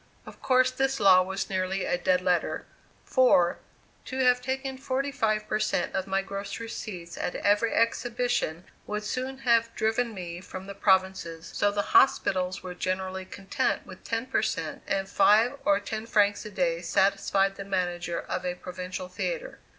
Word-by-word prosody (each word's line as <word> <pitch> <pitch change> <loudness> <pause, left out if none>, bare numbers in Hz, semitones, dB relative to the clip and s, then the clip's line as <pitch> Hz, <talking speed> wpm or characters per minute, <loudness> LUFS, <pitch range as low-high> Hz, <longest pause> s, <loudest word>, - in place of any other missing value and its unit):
Of - - -13
course 255 0 +3
this 270 +1 0
law 190 -2 +7
was 190 +1 -3
nearly 190 0 -1
a - - +1
dead 180 0 +2
letter; 180 -2 0 0.4
for, 245 -10 +4 0.5
to 260 - -5
have 250 -1 +4
taken 265 +1 -3
forty 270 +2 -1
five 215 -4 0
per 215 - 0
cent 215 - 0
of 190 0 -2
my 195 0 0
gross 195 +2 -5
receipts 195 -6 -7
at - - -2
every 205 +3 +2
exhibition 230 -7 0 0.2
would 210 0 -3
soon 255 +5 -3
have 230 -1 +4
driven 225 +1 0
me 175 -2 -6
from 185 0 -8
the 200 - -7
provinces, 190 -4 +1
so 205 - +2
the 205 0 -1
hospitals 185 -7 +3
were 180 -1 -6
generally 185 +1 -3
content 195 +1 -2
with - - -12
ten 230 +1 -2
per 260 - +1
cent, - - -3
and 195 -1 -1
five 230 +8 +4
or 200 0 +4
ten 220 +2 -5
francs 205 -1 +2
a - - -5
day 175 -4 0
satisfied 195 +2 +2
the 195 - -6
manager 175 -3 -2
of 180 - -4
a 180 -1 -2
provincial 180 0 -6
theatre. - - -4
200 Hz, 170 wpm, -27 LUFS, 185-230 Hz, 0.5 s, law